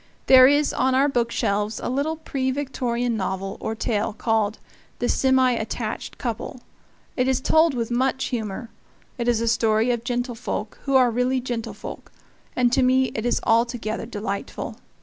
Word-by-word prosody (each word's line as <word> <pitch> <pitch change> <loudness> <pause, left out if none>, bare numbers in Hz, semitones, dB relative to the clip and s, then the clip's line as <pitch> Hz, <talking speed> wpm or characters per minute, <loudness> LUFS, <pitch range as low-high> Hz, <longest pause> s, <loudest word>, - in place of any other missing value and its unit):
There 255 -1 +8
is 290 +1 +3
on 260 0 +1
our 275 +2 +4
book 240 -4 0
shelves 210 0 -1
a - - -4
little 280 +5 -1
pre 275 -4 -2
Victorian 245 -3 -1
novel 195 -1 -3
or 220 - -3
tale 215 -2 -1
called 220 -1 0 0.4
"The - - -1
Semi 260 -1 +3
Attached 220 -1 -4
Couple." 245 +1 -5 0.5
It 255 0 +1
is 265 -1 +2
told 315 +1 +3
with 235 -1 -2
much 260 +2 +1
humor; 225 -1 -4 0.5
it 235 - -1
is 235 -2 +2
a 230 - -1
story 225 +1 +2
of 235 -1 -2
gentlefolk 245 -3 -3
who 275 -1 +1
are 250 -2 +5
really 250 +2 +1
gentlefolk; 240 -3 -6 0.4
and 245 -1 +3
to 265 - +4
me 260 0 +3
it 220 +2 -2
is - - +1
altogether 230 -1 0
delightful. 205 -3 -5
245 Hz, 165 wpm, -23 LUFS, 225-260 Hz, 0.5 s, There